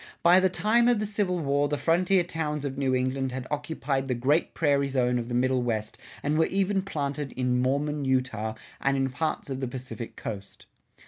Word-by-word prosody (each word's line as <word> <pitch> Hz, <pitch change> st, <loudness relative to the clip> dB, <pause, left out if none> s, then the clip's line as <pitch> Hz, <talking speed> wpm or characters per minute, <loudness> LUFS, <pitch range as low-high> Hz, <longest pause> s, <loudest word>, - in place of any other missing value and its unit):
By 175 Hz, +2 st, +7 dB
the 190 Hz, 0 st, +3 dB
time 230 Hz, +5 st, +3 dB
of 245 Hz, -1 st, +4 dB
the 215 Hz, -, -1 dB
Civil 200 Hz, -3 st, 0 dB
War 145 Hz, -2 st, +1 dB
the 145 Hz, -, 0 dB
frontier 175 Hz, +5 st, +3 dB
towns 150 Hz, -4 st, -3 dB
of 135 Hz, -1 st, -3 dB
New 130 Hz, -2 st, +1 dB
England 130 Hz, +1 st, 0 dB
had 130 Hz, 0 st, -5 dB
occupied 145 Hz, -2 st, -2 dB
the 125 Hz, -, 0 dB
great 140 Hz, +7 st, +1 dB
prairie 140 Hz, -3 st, +2 dB
zone 125 Hz, -2 st, +1 dB
of 120 Hz, 0 st, -5 dB
the 120 Hz, -, -2 dB
Middle 130 Hz, +1 st, +2 dB
West 110 Hz, -3 st, -2 dB, 0.3 s
and 150 Hz, +2 st, +1 dB
were 160 Hz, -, +4 dB
even 195 Hz, 0 st, +1 dB
planted 145 Hz, -6 st, -3 dB
in 125 Hz, -1 st, +1 dB
Mormon 145 Hz, +3 st, 0 dB
Utah 130 Hz, -5 st, 0 dB, 0.3 s
and 135 Hz, 0 st, +2 dB
in 135 Hz, -1 st, 0 dB
parts 155 Hz, 0 st, -2 dB
of 130 Hz, -, -3 dB
the 130 Hz, -, -2 dB
Pacific 125 Hz, -1 st, -7 dB
Coast. 100 Hz, -2 st, -7 dB
140 Hz, 200 wpm, -27 LUFS, 130-160 Hz, 0.3 s, By